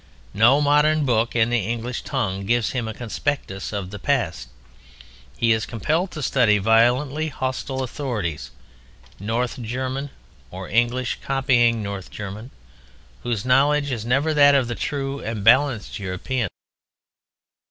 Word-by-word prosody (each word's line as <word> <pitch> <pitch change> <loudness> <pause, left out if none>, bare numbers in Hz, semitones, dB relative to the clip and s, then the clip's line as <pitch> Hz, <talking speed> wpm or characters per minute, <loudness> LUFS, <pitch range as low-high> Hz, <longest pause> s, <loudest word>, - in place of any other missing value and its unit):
No 120 +8 +5
modern 150 +1 +3
book 115 -2 +1
in 120 0 +2
the 120 - +2
English 115 +4 -3
tongue 100 -8 -3
gives 120 0 +1
him 120 -4 -2
a 110 - -4
conspectus 120 -4 -3
of 100 -3 -4
the 105 - -7
past; - - -1 0.9
he 115 -1 +2
is 110 0 +1
compelled 155 - -1
to 155 -5 -6
study 115 -7 +3
violently 125 +8 +2
hostile 130 -1 -3
authorities, 120 - -4 0.7
North 115 +5 -2
German 130 +4 -3 0.4
(or 95 0 -8
English 120 +2 0
copying 120 -4 +2
North 100 -2 -6
German), 105 +4 -7 0.7
whose 120 -3 -3
knowledge 145 +3 +3
is 115 -4 -3
never 135 +7 +1
that 145 -1 +6
of 130 -3 +2
the 120 - -3
true 140 +2 -3
and 110 -5 -5
balanced 125 -2 +3
European. 100 +5 -3
120 Hz, 135 wpm, -22 LUFS, 110-135 Hz, 0.9 s, that